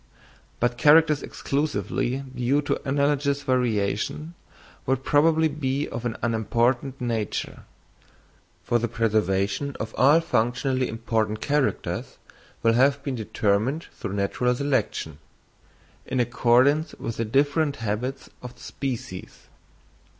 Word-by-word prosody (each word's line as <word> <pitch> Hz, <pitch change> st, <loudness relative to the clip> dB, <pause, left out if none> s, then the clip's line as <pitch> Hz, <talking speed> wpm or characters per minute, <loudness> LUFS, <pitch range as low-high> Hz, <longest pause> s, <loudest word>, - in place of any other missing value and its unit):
But 120 Hz, 0 st, 0 dB
characters 155 Hz, -1 st, +5 dB
exclusively 140 Hz, -2 st, -2 dB
due 135 Hz, +4 st, +1 dB
to -, -, -1 dB
analogous 140 Hz, 0 st, +1 dB
variation 125 Hz, +3 st, -1 dB, 0.5 s
would 130 Hz, 0 st, 0 dB
probably 160 Hz, +3 st, +3 dB
be 145 Hz, -1 st, -2 dB
of 120 Hz, +1 st, -6 dB
an 115 Hz, -1 st, -2 dB
unimportant 120 Hz, +4 st, 0 dB
nature, 115 Hz, -4 st, -3 dB, 1.0 s
for 120 Hz, -, +1 dB
the 120 Hz, -, -1 dB
preservation 110 Hz, +2 st, 0 dB
of 110 Hz, 0 st, -5 dB
all 145 Hz, +5 st, +6 dB
functionally 130 Hz, -2 st, 0 dB
important 110 Hz, -1 st, -1 dB
characters 145 Hz, -2 st, -1 dB, 0.5 s
will 115 Hz, 0 st, +4 dB
have 135 Hz, +3 st, +3 dB
been 140 Hz, -, -2 dB
determined 110 Hz, +5 st, -1 dB
through 100 Hz, -, -6 dB
natural 115 Hz, +5 st, 0 dB
selection, 130 Hz, -, -1 dB, 0.9 s
in 130 Hz, -, -1 dB
accordance 125 Hz, +5 st, +3 dB
with 115 Hz, -, -5 dB
the 115 Hz, -, -1 dB
different 145 Hz, +5 st, +1 dB
habits 115 Hz, +3 st, -3 dB
of 125 Hz, -1 st, -9 dB
the -, -, -19 dB
species. 120 Hz, -9 st, -6 dB
125 Hz, 115 wpm, -25 LUFS, 115-140 Hz, 1.0 s, all